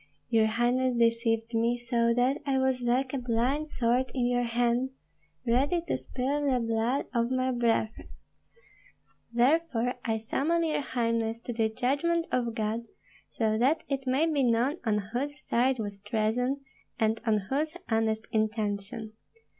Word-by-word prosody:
Your 220 -1 +4
highness 240 +2 +1
deceived 230 0 +1
me, 230 +1 +2
so 235 -1 +1
that 250 +4 +2
I 275 -2 0
was 265 -1 +1
like 255 +2 +1
a 275 - 0
blind 250 +6 0
sword 250 +1 +1
in 250 -2 +1
your 245 0 +2
hand, 240 +2 +1 0.6
ready 270 +9 +2
to - - 0
spill 260 - -2
the 255 -2 +2
blood 230 +3 0
of 235 -1 +1
my 255 0 +1
brethren. 230 -2 0 1.2
Therefore 250 0 +2
I 225 -1 0
summon 300 +10 0
your 310 -2 0
highness 230 -3 -1
to 240 - -5
the 225 -1 +1
judgment 285 +9 0
of 235 -3 0
God, 220 +1 -2 0.4
so 220 -1 0
that 275 +7 +2
it 270 -1 -2
may 265 +5 +3
be 305 -4 +1
known 245 +5 +2
on 210 -1 +3 0.2
whose 285 +3 -2
side 255 +2 +2
was 205 -3 -5
treason, 225 +6 0 0.4
and 220 0 +1
on 215 -1 +4
whose 305 +4 0
honest 220 -1 0
intention. 215 0 -2
240 Hz, 150 wpm, -29 LUFS, 225-265 Hz, 1.2 s, Your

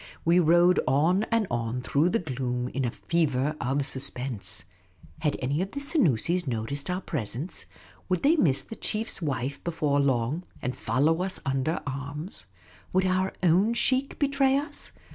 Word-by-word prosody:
We 170 +2 +5
rode 175 +2 +5
on 165 +10 +3
and 230 -2 +1
on 120 +1 -2
through 150 +7 +2
the 230 - +2
gloom 125 - -2
in 135 0 -2
a - - +1
fever 150 0 0
of 130 +3 0
suspen.se. 125 -9 -4 0.5
Had 150 - 0
any 140 +5 0
of 195 +1 -4
the 280 - -3
Senoosis 180 - +1
noticed 130 +6 -2
our 180 +1 -1
presence? 140 - -2 0.4
Would 180 -2 0
they 305 +4 +5
miss 140 - +2
the 225 - -9
chief's 220 -2 -1
wife 140 -3 -2
before 150 -4 0
long, 135 +2 +1 0.2
and 125 0 -3
follow 140 +9 +1
us 185 0 -2
under 135 +4 0
arms? 140 - -6 0.5
Would 185 0 +3
our 185 +1 +1
own 190 +7 +4
sheikh 260 +3 +1
betray 275 -1 +3
us 290 +2 -3
155 Hz, 160 wpm, -27 LUFS, 130-185 Hz, 0.5 s, We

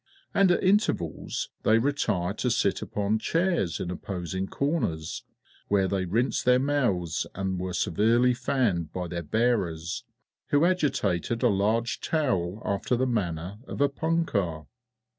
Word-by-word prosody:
And 195 -2 +4
at 175 - +2
intervals 185 - 0
they 110 - +4
retired 110 -8 0
to 125 - +1
sit 100 -4 +1
upon 105 +1 -1
chairs 165 - 0
in 90 - -3
opposing 95 +1 -4
corners, 115 - -2 0.4
where 100 -2 +2
they 95 -1 -1
rinsed 115 +9 0
their 125 0 +5
mouths, 125 - 0
and 95 -1 -2
were 90 0 -3
severely 115 +8 +3
fanned 110 - 0
by 90 0 -4
their 85 0 -4
bearers, 95 -2 0 0.4
who 145 +2 +3
agitated 120 - 0
a 120 - +5
large 110 +3 +1
towel 110 - -1
after 100 +5 0
the 130 +2 +1
manner 95 -5 -2
of - - -6
a 145 0 +4
punkah. 135 - -1
105 Hz, 140 wpm, -27 LUFS, 90-130 Hz, 0.4 s, their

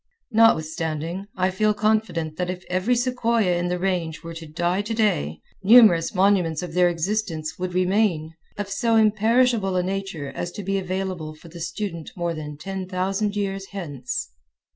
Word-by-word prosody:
Notwithstanding, 165 -4 +1
I 185 +1 +2
feel 210 +3 +2
confident 210 -8 0
that 180 -1 -2
if 180 0 -5
every 185 +7 +2
sequoia 235 -6 +1
in 175 0 -1
the 180 0 -1
Range 175 -4 -2
were 165 0 -7
to 165 -1 -8
die 175 +5 0
today, 205 - 0 0.2
numerous 200 -5 +6
monuments 180 -4 +2
of 175 -3 -6
their 180 0 +4
existence 170 -2 -2
would 180 0 -3
remain, 185 -4 +1 0.2
of 205 -1 -3
so 230 +3 +1
imperishable 220 -1 +3
a 180 - +2
nature 190 -6 -3
as 175 +4 -4
to 205 - -6
be 195 +1 0
available 185 -4 -4
for 165 +2 -14
the 170 +1 -10
student 170 -2 -4
more 170 -1 -1
than 150 -2 -7
ten 190 +3 -5
thousand 195 +3 -1
years 195 -1 -2
hence. 145 -10 -4
185 Hz, 165 wpm, -24 LUFS, 165-205 Hz, 0.2 s, numerous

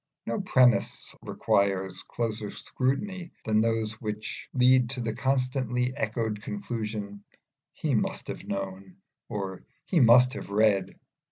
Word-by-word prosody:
No - - -2
premisses 130 -10 +3
require 95 -1 +1 0.2
closer 110 -3 -3
scrutiny 170 - -2 0.2
than 110 -1 +3
those 115 -1 +1
which 105 -1 -5
lead 125 -1 +4
to 130 - -3
the 115 -2 -1
constantly 125 -1 0
echoed 110 -1 -2
conclusion, 105 - -5 0.5
"He - - -2
must - - 0
have - - -6
known," 95 -1 -5 0.3
or 95 -3 -4 0.2
"He 175 - +2
must 125 0 +7
have - - -7
read." 105 -1 +2
115 Hz, 120 wpm, -28 LUFS, 105-125 Hz, 0.5 s, must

